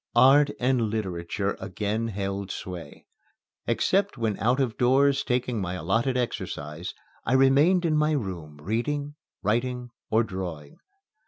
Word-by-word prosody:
Art 135 Hz, +4 st, +7 dB
and 125 Hz, -3 st, +2 dB
literature 100 Hz, -2 st, -2 dB
again 105 Hz, +4 st, -2 dB
held 100 Hz, -2 st, -3 dB
sway. 90 Hz, -3 st, -7 dB, 0.6 s
Except 200 Hz, -5 st, +1 dB
when 110 Hz, -3 st, 0 dB
out 125 Hz, +5 st, +2 dB
of 125 Hz, -5 st, 0 dB
doors 135 Hz, +3 st, +3 dB
taking 125 Hz, -3 st, -1 dB
my 90 Hz, -1 st, -3 dB
allotted 115 Hz, -, 0 dB
exercise, 80 Hz, -9 st, -4 dB, 0.3 s
I 125 Hz, -, 0 dB
remained 140 Hz, +7 st, +5 dB
in 155 Hz, -2 st, +2 dB
my 150 Hz, +1 st, +3 dB
room 90 Hz, -, -4 dB
reading, 140 Hz, -, -2 dB, 0.3 s
writing, 125 Hz, +3 st, -1 dB, 0.2 s
or 110 Hz, +2 st, +3 dB
drawing. 90 Hz, -8 st, -6 dB
115 Hz, 130 wpm, -26 LUFS, 95-135 Hz, 0.6 s, Art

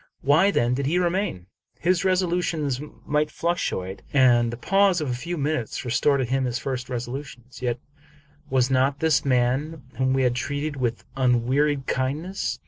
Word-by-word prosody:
Why 155 Hz, +8 st, +4 dB
then 120 Hz, -10 st, +1 dB
did 135 Hz, +1 st, -1 dB
he 170 Hz, +5 st, +1 dB
remain? 175 Hz, -, -1 dB, 0.3 s
His 180 Hz, 0 st, +2 dB
resolutions 175 Hz, -7 st, 0 dB, 0.2 s
might 150 Hz, +1 st, +1 dB
fluctuate, 125 Hz, -, -2 dB
and 120 Hz, -4 st, +4 dB
the 120 Hz, -, -6 dB
pause 195 Hz, +5 st, +3 dB
of 150 Hz, -5 st, -2 dB
a -, -, 0 dB
few 170 Hz, +8 st, -4 dB
minutes 145 Hz, -5 st, -2 dB
restore 140 Hz, +4 st, +2 dB
to 130 Hz, -, 0 dB
him 130 Hz, +2 st, 0 dB
his 120 Hz, -1 st, -1 dB
first 130 Hz, -2 st, -4 dB
resolutions. 125 Hz, 0 st, -6 dB
Yet 120 Hz, -1 st, -1 dB, 0.7 s
was 130 Hz, 0 st, +2 dB
not 135 Hz, +2 st, +2 dB
this 160 Hz, -3 st, +3 dB
the 140 Hz, -, -4 dB
man 130 Hz, +5 st, +1 dB, 0.2 s
whom 130 Hz, 0 st, +2 dB
we 135 Hz, 0 st, +2 dB
had 125 Hz, -1 st, +2 dB
treated 145 Hz, +4 st, -3 dB
with 120 Hz, -3 st, -2 dB
un 125 Hz, -3 st, +2 dB
wearied 140 Hz, +1 st, +1 dB
kindness 150 Hz, +11 st, -2 dB
135 Hz, 170 wpm, -24 LUFS, 125-155 Hz, 0.7 s, Why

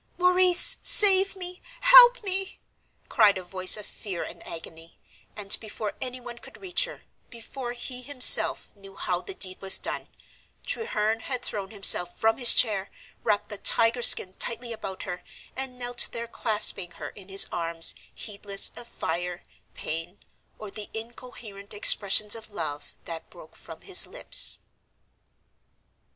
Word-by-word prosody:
"Maurice, 360 Hz, 0 st, +2 dB
save 390 Hz, -1 st, +5 dB
me, 360 Hz, -1 st, -10 dB, 0.2 s
help -, -, +7 dB
me!" 390 Hz, -1 st, -5 dB, 0.5 s
cried 210 Hz, -5 st, +2 dB
a 185 Hz, -, -8 dB
voice 185 Hz, +2 st, +2 dB
of 210 Hz, -, -10 dB
fear 190 Hz, -6 st, -8 dB
and -, -, -12 dB
agony, 165 Hz, 0 st, -11 dB, 0.4 s
and 200 Hz, -2 st, +2 dB
before 215 Hz, -1 st, -8 dB
anyone 245 Hz, -2 st, -8 dB
could 265 Hz, -, -16 dB
reach 380 Hz, +5 st, +1 dB
her, -, -, -13 dB, 0.3 s
before 240 Hz, +1 st, -9 dB
he 250 Hz, +1 st, -8 dB
himself 255 Hz, -1 st, +5 dB
knew 195 Hz, -1 st, -16 dB
how 180 Hz, -1 st, -4 dB
the 390 Hz, -, -10 dB
deed 185 Hz, -, -4 dB
was 190 Hz, 0 st, +7 dB
done, -, -, -7 dB, 0.6 s
Treherne 220 Hz, -, -4 dB
had 250 Hz, +1 st, -6 dB
thrown 200 Hz, -5 st, -5 dB
himself 195 Hz, -4 st, +1 dB
from 225 Hz, +2 st, -1 dB
his 245 Hz, -2 st, +7 dB
chair, 200 Hz, -4 st, +1 dB, 0.3 s
wrapped 210 Hz, -3 st, -2 dB
the 205 Hz, -, -8 dB
tiger 230 Hz, +1 st, +2 dB
skin 185 Hz, -5 st, +4 dB
tightly 235 Hz, 0 st, -1 dB
about 190 Hz, -4 st, -9 dB
her, 180 Hz, -, -8 dB, 0.3 s
and 260 Hz, -1 st, -6 dB
knelt 245 Hz, -1 st, 0 dB
there 235 Hz, 0 st, -6 dB
clasping 210 Hz, -5 st, -1 dB
her -, -, -10 dB
in 200 Hz, -2 st, -15 dB
his 195 Hz, 0 st, +3 dB
arms 165 Hz, -1 st, 0 dB, 0.2 s
heedless 200 Hz, -2 st, -2 dB
of 240 Hz, -, -12 dB
fire, 175 Hz, 0 st, -6 dB, 0.3 s
pain, 165 Hz, +4 st, -6 dB, 0.4 s
or 215 Hz, -2 st, -11 dB
the 210 Hz, 0 st, -10 dB
incoherent 220 Hz, -3 st, -12 dB
expressions 205 Hz, 0 st, +2 dB
of 220 Hz, -1 st, -9 dB
love 160 Hz, -7 st, -8 dB
that 165 Hz, -1 st, -10 dB
broke 165 Hz, -3 st, -17 dB
from 160 Hz, -1 st, -14 dB
his 380 Hz, -1 st, +3 dB
lips. -, -, -1 dB
215 Hz, 145 wpm, -24 LUFS, 190-250 Hz, 0.6 s, help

